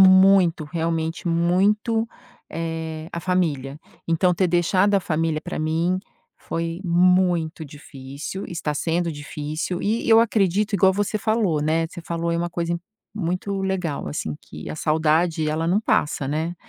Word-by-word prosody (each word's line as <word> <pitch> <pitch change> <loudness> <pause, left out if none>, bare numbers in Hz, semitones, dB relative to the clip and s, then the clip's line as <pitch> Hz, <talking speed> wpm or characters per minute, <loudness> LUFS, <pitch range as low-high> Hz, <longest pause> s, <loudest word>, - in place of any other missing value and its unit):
muito, 190 -3 +6
realmente, 165 +2 -2
muito, 205 +7 +2 0.4
eh, 160 -1 -4
a 170 - -3
família, 150 -7 -1 0.3
então 165 +2 +3
ter 185 +2 +2
deixado 185 +3 +2
a 200 - +4
família, 160 -2 -1
pra 175 +2 -5
mim 165 +4 0 0.4
foi 165 +1 -4
muito 175 -2 +2
difícil, 145 +4 -8
está 160 -3 -3
sendo 170 +2 0
difícil, 150 +4 -4
e 220 +3 0
eu 225 0 +7
acredito, 210 -2 +1
igual 190 0 +5
você 205 +2 -1
falou, 205 -8 +1
né, 165 +2 +1
você 175 - -9
falou 170 0 -2
aí 170 - 0
uma 175 0 -2
coisa 170 0 -2 0.4
muito 195 +1 -2
legal, 185 - -2
assim, 75 +1 -3
que 75 - -9
a - - -5
saudade, 160 +1 +1
ela 160 +2 -1
não 190 +5 +2
passa, 150 -9 0
né, 160 +5 -2
170 Hz, 145 wpm, -23 LUFS, 160-185 Hz, 0.4 s, eu